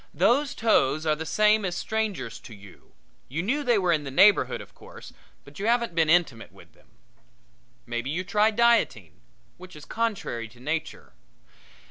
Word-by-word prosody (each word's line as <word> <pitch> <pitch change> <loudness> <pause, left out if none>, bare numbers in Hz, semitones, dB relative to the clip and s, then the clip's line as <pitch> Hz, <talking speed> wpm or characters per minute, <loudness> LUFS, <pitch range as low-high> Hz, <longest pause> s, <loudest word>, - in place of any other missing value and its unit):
Those 270 - +2
toes 155 - +1
are 155 -1 +2
the 160 +1 -7
same 215 0 +3
as 180 -2 -3
strangers 210 - -3
to 115 - -13
you 100 -2 -17 0.4
you 160 +7 -3
knew 280 +9 -1
they 240 -4 +2
were 180 -3 +1
in 150 -2 -1
the 140 - -6
neighborhood, 195 +9 +4
of - - -13
course, - - -14 0.3
but - - -14
you 205 - -2
haven't 235 -4 +1
been 165 -2 +1
intimate 160 -9 +1
with - - -19
them. - - -26 1.0
Maybe 120 +2 -4
you 170 +5 -2
try 210 +3 +2
dieting, 235 +1 +1 0.4
which 185 -1 -13
is 150 -1 -12
contrary 205 - -3
to 120 +3 -20
nature. 150 - -5
180 Hz, 170 wpm, -25 LUFS, 145-220 Hz, 1.0 s, neighborhood